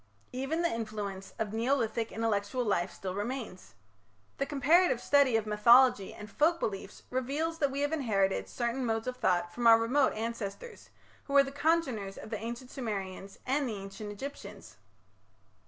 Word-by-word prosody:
Even 270 +7 -1
the 340 - +1
influence 210 -4 -5
of 215 -1 -3
Neolithic 230 -1 0
intellectual 225 +2 -1
life 185 -5 0
still 185 -1 -6
remains. 215 -1 -5 0.6
The 275 - 0
comparative 295 +1 +3
study 275 -3 +4
of 220 - -2
mythology 215 0 +5
and 210 - -10
folk 325 +8 +2
beliefs 195 -1 -4
reveals 290 +6 -2
that 285 - +2
we 275 +1 -3
have 290 +1 0
inherited 205 -10 0
certain 240 +2 -2
modes 225 -2 -1
of 255 0 -4
thought 175 -4 +1
from 240 +3 +1
our 225 0 +9
remote 255 +5 +2
ancestors, 230 - -6 0.4
who 280 - -6
were 280 0 +7
the 275 - -6
congeners 275 -10 0
of - - -9
the 215 - -2
Ancient 240 +3 -6
Sumerians 195 -5 -5
and 270 0 0
the 220 - -3
Ancient 195 +1 -7
Egyptians. 205 - -9
230 Hz, 160 wpm, -30 LUFS, 205-275 Hz, 0.6 s, our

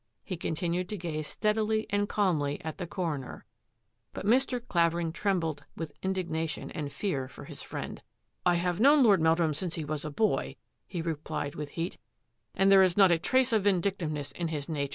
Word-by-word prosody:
He 185 - -4
continued 175 +2 -2
to 210 - -3
gaze 155 -4 -4
steadily 215 0 0
and 205 0 +1
calmly 155 -8 +1
at 160 +4 -5
the 180 - -3
coroner. 160 -8 -4 0.7
But - - -6
Mr. 250 +3 +3
Clavering 170 -1 +2
trembled 165 -6 -1
with 165 -2 -4
indignation 170 -4 -2
and 145 -3 -4
fear 140 -10 -2
for - - -11
his - - -7
friend. - - -6 0.2
" - - -49
I 175 -1 +4
have 175 +1 0
known 285 +4 +6
Lord 200 -7 +5
Meldrum 160 -1 +3
since 170 +3 -3
he 160 - -4
was 150 0 -3
a 155 - -3
boy," 215 +9 0 0.3
he 170 -3 -4
replied 155 -3 -3
with 150 -1 -5
heat, 170 +3 -3 0.3
" - - -39
and 195 0 +4
there 195 -1 +8
is 185 -1 +3
not 195 -3 +7
a 170 - +3
trace 260 +6 +3
of 210 -3 +2
vindictiveness 170 -7 0
in 170 +5 -3
his 150 -3 -4
nature." 140 -3 -2
170 Hz, 195 wpm, -29 LUFS, 155-195 Hz, 0.7 s, there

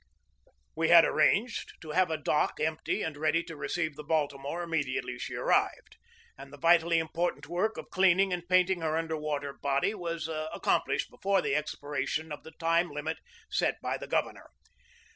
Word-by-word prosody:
We 160 0 +1
had 170 -1 +9
arranged 210 +10 +1
to 155 - -7
have 185 +2 +3
a 160 - -1
dock 150 0 0
empty 155 0 -1
and 160 -2 -3
ready 155 +3 +1
to 165 -1 -9
receive 160 0 -2
the 150 - -8
Baltimore 145 +1 -1
immediately 160 - -2
she - - -5
ar - - -4
rived, - - +1 0.4
and 135 0 -12
the 145 - -11
vitally 170 +1 +4
important 165 -2 -1
work 180 +7 -1
of - - -8
cleaning 190 0 +4
and 175 0 -5
painting 185 -1 +3
her 160 0 0
under 165 -1 -2
water 145 -2 -3
body 140 +9 0
was 170 -5 -4
accomplished 155 -1 -1
before 195 0 +1
the - - 0
expiration 145 +1 -3
of 150 - -6
the 160 - -13
time 165 +2 +1
limit 150 +2 -4 0.3
set - - 0
by - - -2
the - - -7
governor. - - -2
160 Hz, 175 wpm, -30 LUFS, 150-175 Hz, 0.4 s, had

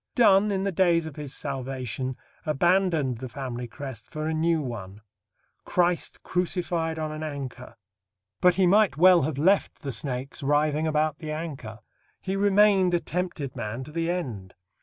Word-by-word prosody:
Donne, 210 -4 +5
in 190 -1 0
the 195 - 0
days 170 -2 +3
of 160 -3 -7
his 150 -3 -6
salvation, 130 -2 -4 0.3
abandoned 160 -4 +2
the 130 0 -6
family 125 -2 -5
crest 125 -1 -8
for 155 -1 -4
a 160 - -1
new 165 +1 +2
one 110 -7 -6 0.6
Christ 175 -1 0
crucified 175 -2 -1
on 155 -1 -3
an 155 0 -6
anchor. 135 -5 -6 0.6
But 180 -1 +5
he 190 0 +3
might 200 -3 +4
well 180 +1 +7
have 140 0 -2
left 190 +7 +2
the 140 - -3
snakes 130 +4 -5
writhing 150 +2 +1
about 155 0 0
the 155 -3 -6
anchor. 140 -8 -6 0.4
He 190 0 -3
remained 200 -2 +4
a - - +2
tempted 170 -7 -4
man 115 +1 -4
to 150 - -11
the 165 +1 -1
end. 120 - -4
155 Hz, 160 wpm, -26 LUFS, 130-180 Hz, 0.6 s, well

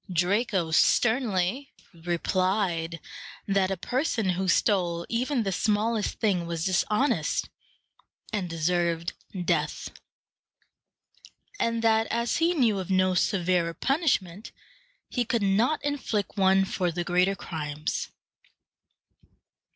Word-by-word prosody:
Draco 180 0 +1
sternly 225 - +2 0.2
replied 175 0 -1 0.5
that 195 -1 +2
a 195 - -2
person 245 - -1
who 190 +2 -2
stole 175 -3 +1
even 245 +1 0
the 195 - -1
smallest 215 +2 0
thing 185 -6 +1
was 170 0 -3
dishonest, 210 +8 +1 0.8
and 190 -4 -2
deserved 170 0 0 0.3
death; 155 -4 -1 1.7
and 230 0 0
that, 225 0 +3
as 235 +1 -1
he 340 +2 +2
knew 230 -9 +2
of 185 - -6
no 185 0 +3
severer 180 -3 +1
punishment, 235 - -1 0.6
he 245 - -1
could 235 -2 -1
not 225 +10 +1
inflict 260 -8 -2
one 195 0 +4
for 180 -2 -1
the 175 +1 -3
greater 180 +3 +2
crimes. 150 -3 -4
190 Hz, 105 wpm, -27 LUFS, 175-225 Hz, 1.7 s, one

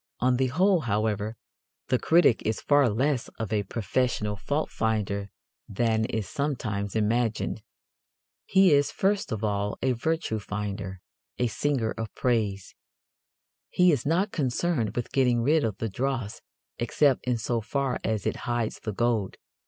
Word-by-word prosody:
On 125 +1 +2
the 130 0 +2
whole, 180 +8 +3
however, 110 -3 -1 0.5
the 125 - +2
critic 165 -8 +4
is 110 - -1
far 145 -3 +4
less 130 +4 0
of 110 -1 -3
a 105 - +2
professional 105 +1 -1
faultfinder 105 -4 -1 0.4
than 110 +1 +1
is 110 -2 -3
sometimes 110 -9 -2
imagined. 110 +1 0 0.9
He 190 -4 +5
is 145 0 +4
first 195 -3 0
of 110 -1 -3
all 100 -1 -1
a 130 - +3
virtue 125 -2 -1
finder, 100 -2 -5 0.4
a 125 - +1
singer 120 0 0
of 115 -1 -4
praise. 105 -6 0 1.0
He 180 0 +4
is 140 -7 0
not 180 +7 +1
concerned 135 - 0
with 120 - -3
getting 125 -3 +2
rid 150 +4 +3
of 110 -4 -1
the 115 - -2
dross 120 0 -3 0.4
except 130 +3 +2
in 125 -1 +2
so 115 +1 -1
far 135 +3 -1
as 110 -2 -1
it - - -1
hides 120 -2 -1
the 110 - -4
gold. 115 -2 0
115 Hz, 145 wpm, -27 LUFS, 105-140 Hz, 1.0 s, He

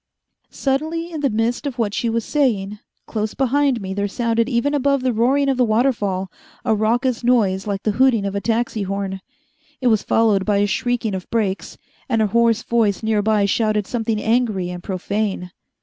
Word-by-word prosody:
Suddenly, 315 +5 -2
in 315 -3 -5
the 280 - +2
midst 230 +5 -1
of 265 -3 -5
what 215 -4 -1
she 235 - -1
was 230 0 -1
saying, 210 -8 0 0.3
close 215 -1 -3
behind 275 -1 +2
me 190 0 -4
there 200 +1 -1
sounded 230 +2 0
even 260 +3 +1
above 280 -1 +1
the 255 -1 +1
roaring 265 +5 +2
of 270 -2 +1
the 255 - +4
waterfall 215 -6 0 0.3
a 225 - +3
raucous 235 +4 0
noise 210 -6 +2
like 200 -1 -3
the 215 - +1
hooting 230 -2 +3
of 200 - -2
a 200 - -2
taxi 230 -1 -1
horn. 195 -1 -3 0.6
It 250 - +2
was 220 -2 +3
followed 215 -4 +2
by 205 0 +1
a 205 - +3
shrieking 235 +1 -1
of 185 -1 -5
brakes, 205 -4 -2 0.3
and 230 -3 +1
a 220 - +3
hoarse 230 -1 +3
voice 225 -4 +1
near 220 -1 +1
by 210 -1 +2
shouted 215 0 +1
something 225 -2 -2
angry 220 -6 0
and 180 0 -7
profane. 190 0 -3
225 Hz, 190 wpm, -20 LUFS, 200-245 Hz, 0.6 s, the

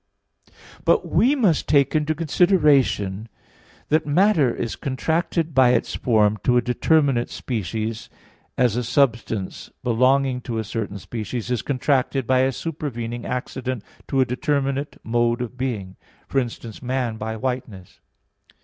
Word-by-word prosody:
But - - +2
we 265 +5 +4
must 205 - +2
take 140 -2 +4
into 155 0 +1
consideration 145 - +2 0.6
that 155 +1 +3
matter 160 - +3
is 115 - -4
contracted 160 +4 -1
by 130 -2 +5
its - - 0
form 110 -3 +2
to 125 -1 +3
a - - +4
determinate 135 0 +2
species, 110 0 -4 0.5
as 125 -4 +3
a 125 - 0
substance, 115 -6 0
belonging 130 +2 +2
to 115 -2 -4
a 110 - -1
certain 105 -1 -4
species, 115 +3 -5
is 125 - 0
contracted 135 -1 0
by 130 +2 +3
a 130 +1 +3
supervening 120 -6 -5
accident 125 -1 -4 0.2
to 135 - 0
a - - +4
determinate 140 +1 -1
mode 120 +1 +1
of 125 0 -5
being; 110 -8 -4 0.3
for 135 - +1
instance, 120 -3 -6
man 125 -3 -2
by 110 +1 -4
whiteness. 120 -7 -5
125 Hz, 135 wpm, -23 LUFS, 115-140 Hz, 0.6 s, by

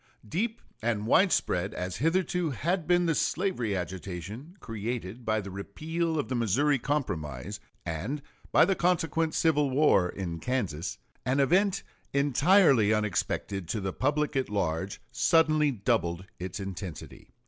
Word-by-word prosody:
Deep 220 - -2 0.2
and 110 -2 0
widespread 105 - +2
as 90 0 -3
hitherto 175 - +1
had 165 +6 -1
been 175 0 +4
the 165 - +2
slavery 150 - 0
agitation 95 - -6
created 115 0 -5
by 110 -1 +1
the 100 -2 -6
repeal 160 - -2
of 145 - -1
the 130 - -3
Missouri 130 +5 +2
Compromise 100 - -3 0.3
and 95 - -3 0.3
by - - +6
the 195 - +2
consequent 165 -3 +1
civil 150 -3 +3
war 130 -10 +4
in 85 -4 -4
Kansas, 95 -10 -2 0.3
an 130 +3 +1
event 185 +8 +3 0.3
entirely 140 - +5
unexpected 100 -3 -1
to 110 - -2
the 95 -2 -3
public 150 +2 0
at 135 -1 0
large 95 -2 -1
suddenly 155 -2 +4
doubled 100 -7 0
its 90 +2 -5
intensity. 95 -3 -7
125 Hz, 135 wpm, -29 LUFS, 95-160 Hz, 0.3 s, by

